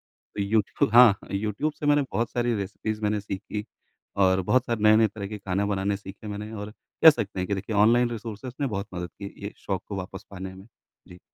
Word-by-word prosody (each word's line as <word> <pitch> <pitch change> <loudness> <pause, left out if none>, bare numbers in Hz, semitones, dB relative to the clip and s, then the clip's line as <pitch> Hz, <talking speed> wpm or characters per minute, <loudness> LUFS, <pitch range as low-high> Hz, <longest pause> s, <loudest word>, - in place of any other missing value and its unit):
तो 100 - -8
यूट्यूब 105 +1 +1
हाँ 120 -2 +9
अ, - - -13
यूट्यूब 105 +9 -1
से 145 - -4
मैंने 145 0 +4
बहुत 115 0 -1
सारी 120 -1 0
रेसिपीज़ 105 +2 -4
मैंने 105 0 +1
सीखी 105 +2 -5 0.5
और 95 -1 +4
बहुत 130 +7 +2
सारे 115 -3 -2
नए-नए 110 +1 +6
तरह 100 -1 -6
के 105 0 -6
खाना 100 0 -1
बनाने 100 0 0
सीखे 100 +1 -10
मैंने, 105 +1 -5
और 105 0 -6 0.3
कह 160 - +13
सकते 110 -9 -2
हैं 90 - -1
कि 100 - 0
देखिए, 100 +3 -4
ऑनलाइन 120 +4 +5
रिसोर्सेज़ 115 +2 -6
ने 140 - +2
बहुत 100 -3 -3
मदद 90 -1 -4
की 100 - -6
ये 100 - -5
शौक 95 -2 -3
को 100 - -5
वापस 95 +1 -7
पाने 95 -1 -7
में। 95 +3 -13 0.4
जी। 90 - -13
105 Hz, 215 wpm, -26 LUFS, 100-115 Hz, 0.5 s, कह